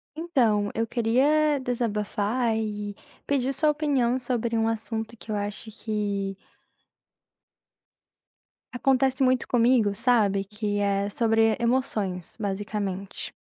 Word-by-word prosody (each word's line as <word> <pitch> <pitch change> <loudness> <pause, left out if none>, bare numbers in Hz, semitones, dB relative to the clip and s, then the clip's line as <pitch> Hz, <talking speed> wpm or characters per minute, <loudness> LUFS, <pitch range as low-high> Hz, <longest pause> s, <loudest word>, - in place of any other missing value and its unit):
Então, 235 -11 +1
eu 225 +1 +1
queria 275 +6 +2
desabafar 230 -1 -1
e 210 -2 -3 0.3
pedir 270 -1 +1
sua 305 +2 +2
opinião 275 -5 +1
sobre 240 -2 -1
um 225 0 +2
assunto 225 0 -3
que 220 - -9
eu - - 0
acho 205 +2 -4
que 205 -3 -3 2.3
acontece 265 +1 +2
muito 255 -1 +2
comigo, 235 -3 +3
sabe, 210 -4 +2
que 210 0 -3
é 200 0 +1
sobre 225 0 +2
emoções 220 -7 -1
basicamente. 200 -1 -4
225 Hz, 105 wpm, -26 LUFS, 205-255 Hz, 2.3 s, comigo